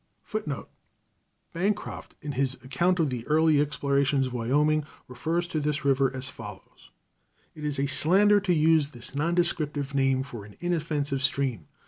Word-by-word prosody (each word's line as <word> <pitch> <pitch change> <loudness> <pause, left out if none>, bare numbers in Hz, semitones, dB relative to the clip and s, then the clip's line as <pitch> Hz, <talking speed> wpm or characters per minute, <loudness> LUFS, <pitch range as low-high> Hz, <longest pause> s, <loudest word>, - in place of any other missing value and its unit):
[Footnote 155 - -4 0.9
A: 165 - -7
Bancroft, 205 +3 -2
in 145 - -3
his 135 -1 -1
account 170 +8 +1
of 155 -5 +2
the 120 -2 -4
early 155 -1 +4
explorations 140 -1 +1
of 130 - -5
Wyoming, 145 +6 +2 0.2
refers 165 +7 -2
to 160 - -1
this 150 0 -1
river 135 -1 +3
as 130 0 -2
follows: 105 -8 -11 0.6
"It 150 - -10
is 150 -2 -1
a 140 - +2
slander 190 +10 +4
to 195 -2 -1
use 160 -2 +4
this 120 -1 -8
non 165 +5 0
descriptive 150 -5 0
name 135 -1 +2
for 120 -6 -8
an 105 0 -14
inoffensive 155 -5 -1
stream. 130 - 0
145 Hz, 160 wpm, -27 LUFS, 135-160 Hz, 0.9 s, early